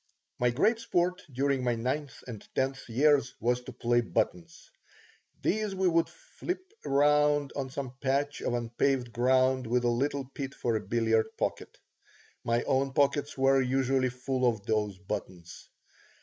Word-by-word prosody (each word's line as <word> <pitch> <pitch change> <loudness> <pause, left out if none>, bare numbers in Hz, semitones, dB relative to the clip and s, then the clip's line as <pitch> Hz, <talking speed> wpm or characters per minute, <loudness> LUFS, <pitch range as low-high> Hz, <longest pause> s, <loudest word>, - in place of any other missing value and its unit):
My 125 - +3
great 215 - +2
sport 180 -4 0
during 135 0 0
my 120 -1 +1
ninth 130 +5 -3
and 115 -5 -8
tenth 135 -1 -1
years 140 +2 +3
was 125 +1 +1
to 130 - -7
play 120 0 +1
buttons. 165 - -3 0.7
These 215 -2 0
we 190 0 +2
would 165 -1 +2
fillip 375 -6 -7
around 145 0 +3
on 135 -2 -3
some 130 -1 -5
patch 140 +2 0
of 120 - -1
unpaved 120 +1 0
ground 130 +1 +2
with 120 +1 +1
a 120 - +3
little 135 +3 0
pit 135 0 -6
for 115 -2 -1
a 110 - 0
billiard 110 -1 0
pocket. - - -3 0.7
My 115 0 +1
own 135 0 +1
pockets 145 +1 +1
were 135 0 +4
usually 130 0 +1
full 125 +1 -1
of 110 -4 -4
these 105 -3 0
buttons. 95 -3 -7
130 Hz, 150 wpm, -29 LUFS, 120-145 Hz, 0.7 s, were